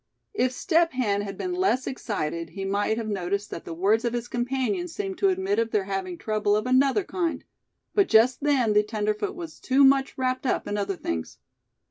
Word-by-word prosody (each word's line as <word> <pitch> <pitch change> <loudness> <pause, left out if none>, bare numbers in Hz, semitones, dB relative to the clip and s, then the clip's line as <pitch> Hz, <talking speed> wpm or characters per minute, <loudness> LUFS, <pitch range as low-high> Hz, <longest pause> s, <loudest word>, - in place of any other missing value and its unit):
If 255 -11 +1
Step 330 +4 +2
Hen 210 -6 0
had 195 -2 -6
been 365 - -3
less 360 -8 +1
excited 170 -10 -3
he 195 - -3
might 205 +3 0
have 230 -2 -3
noticed 200 0 -2
that - - -7
the 165 - -6
words 205 +6 +2
of 235 -1 -1
his 240 0 -3
companion 265 +10 -1
seemed 385 +2 -5
to 395 - +4
admit 380 +2 0
of 230 0 +1
their 210 -3 +1
having 190 -2 -4
trouble 210 0 0
of 215 - 0
another 265 +8 +3
kind; 350 -3 -2 0.5
but 400 -2 +3
just 235 +5 +4
then 270 -7 +2
the 210 - +5
tenderfoot 210 -1 -2
was 335 -3 -8
too 265 +2 +3
much 270 0 +4
wrapped 255 0 -1
up - - 0
in 205 - -2
other 200 -1 -1
things. 85 - -4
235 Hz, 200 wpm, -26 LUFS, 205-280 Hz, 0.5 s, the